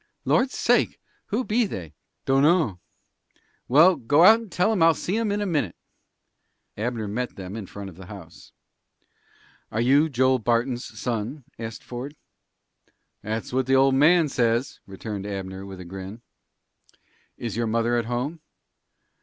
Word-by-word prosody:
"Lord's 260 Hz, +2 st, +2 dB
sake! -, -, +2 dB, 0.3 s
Who 225 Hz, +5 st, -1 dB
be 230 Hz, 0 st, +1 dB
they?" 85 Hz, -, -7 dB, 0.3 s
"Dunno." 135 Hz, -, +3 dB, 0.9 s
"Well, 165 Hz, +8 st, +6 dB
go 145 Hz, +8 st, +3 dB
out 220 Hz, +3 st, +8 dB
and 225 Hz, -5 st, -11 dB
tell 180 Hz, +6 st, +2 dB
'em 210 Hz, -6 st, 0 dB
I'll 165 Hz, -1 st, +6 dB
see' 195 Hz, +5 st, -2 dB
em 225 Hz, -2 st, 0 dB
in 205 Hz, +1 st, -1 dB
a -, -, 0 dB
minute." 150 Hz, -, -1 dB, 1.0 s
Abner 110 Hz, 0 st, -3 dB
met 120 Hz, +4 st, -3 dB
them 95 Hz, +1 st, -7 dB
in 110 Hz, -4 st, -6 dB
front 100 Hz, -1 st, -8 dB
of 90 Hz, -3 st, -11 dB
the 95 Hz, -1 st, -11 dB
house. 95 Hz, -5 st, -12 dB, 1.2 s
"Are 110 Hz, -, -2 dB
you 140 Hz, +6 st, +4 dB
Joel 130 Hz, -1 st, +2 dB
Barton's 120 Hz, +2 st, 0 dB
son?" 120 Hz, +4 st, -3 dB, 0.2 s
asked 115 Hz, -1 st, -6 dB
Ford. 125 Hz, +4 st, -7 dB, 1.1 s
"That's 110 Hz, +3 st, -4 dB
what 130 Hz, 0 st, 0 dB
the 135 Hz, -, +4 dB
old 135 Hz, 0 st, +5 dB
man 160 Hz, +4 st, +5 dB
says," 120 Hz, -1 st, 0 dB
returned 100 Hz, +1 st, -6 dB
Abner, 95 Hz, -1 st, -6 dB
with 95 Hz, -1 st, -9 dB
a 90 Hz, -, -8 dB
grin. 95 Hz, +5 st, -8 dB, 1.1 s
"Is 115 Hz, -4 st, -4 dB
your 115 Hz, 0 st, -1 dB
mother 115 Hz, +2 st, +1 dB
at 120 Hz, -1 st, 0 dB
home?" 125 Hz, +7 st, -3 dB
120 Hz, 155 wpm, -25 LUFS, 105-150 Hz, 1.2 s, out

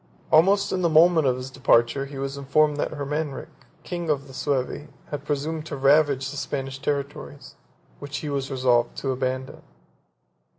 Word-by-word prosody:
Almost 195 Hz, +6 st, +4 dB
in 185 Hz, -, -1 dB
the 170 Hz, -, +2 dB
moment 160 Hz, -1 st, +5 dB
of 125 Hz, -1 st, +1 dB
his 130 Hz, +1 st, -7 dB
departure 130 Hz, 0 st, +2 dB
he 140 Hz, 0 st, -9 dB
was 135 Hz, +1 st, -3 dB
informed 145 Hz, +2 st, +2 dB
that -, -, -2 dB
Hermanric, 145 Hz, 0 st, -4 dB, 0.3 s
king 175 Hz, -2 st, -4 dB
of 140 Hz, -2 st, 0 dB
the 135 Hz, -, -13 dB
Suevi, 140 Hz, +2 st, -2 dB, 0.2 s
had 145 Hz, -1 st, -5 dB
presumed 150 Hz, +2 st, -2 dB
to 145 Hz, -, -5 dB
ravage 140 Hz, 0 st, +3 dB
the 145 Hz, -, -7 dB
Spanish 135 Hz, -1 st, -4 dB
territories, 140 Hz, -1 st, -4 dB, 0.5 s
which 145 Hz, +1 st, -6 dB
he 150 Hz, -, -5 dB
was 140 Hz, -1 st, -2 dB
resolved 125 Hz, -2 st, +1 dB
to 135 Hz, -, -2 dB
abandon. 130 Hz, 0 st, -3 dB
140 Hz, 165 wpm, -24 LUFS, 135-150 Hz, 0.5 s, moment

